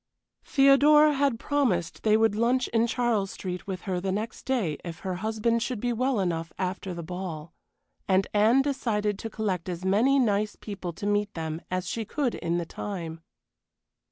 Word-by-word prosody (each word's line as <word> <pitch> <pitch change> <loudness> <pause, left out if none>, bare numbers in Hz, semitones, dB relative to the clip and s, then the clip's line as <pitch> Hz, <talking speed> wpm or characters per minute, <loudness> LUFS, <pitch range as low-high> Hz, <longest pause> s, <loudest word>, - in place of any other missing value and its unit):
Theodora 295 +2 +6
had 275 -4 +1
promised 220 - 0
they 215 -1 +4
would 225 -1 +3
lunch 240 +4 +2
in 230 0 +2
Charles 235 -5 0
Street 180 -1 -6
with 185 -3 -4
her 185 -3 -2
the 190 0 -1
next 215 +4 -4
day 215 - 0
if 170 -1 -7
her 185 -2 -3
husband 220 +3 0
should 240 -1 -2
be 245 +2 0
well 255 0 +1
enough 165 -3 -1
after 185 0 -3
the 170 - -5
ball. 170 -2 -6 0.5
And 190 0 +3
Anne 220 +6 +4
decided 215 -8 -1
to 225 - -5
collect 190 -5 -2
as 180 +1 -5
many 230 +9 +4
nice 210 -4 +1
people 195 -4 -6
to 200 - -7
meet 205 0 +1
them 160 0 -4
as 185 0 -2
she 225 +5 -2
could 260 +2 -1
in 170 0 -2
the 170 - -2
time. 165 -3 -6
205 Hz, 180 wpm, -27 LUFS, 180-240 Hz, 0.5 s, Theodora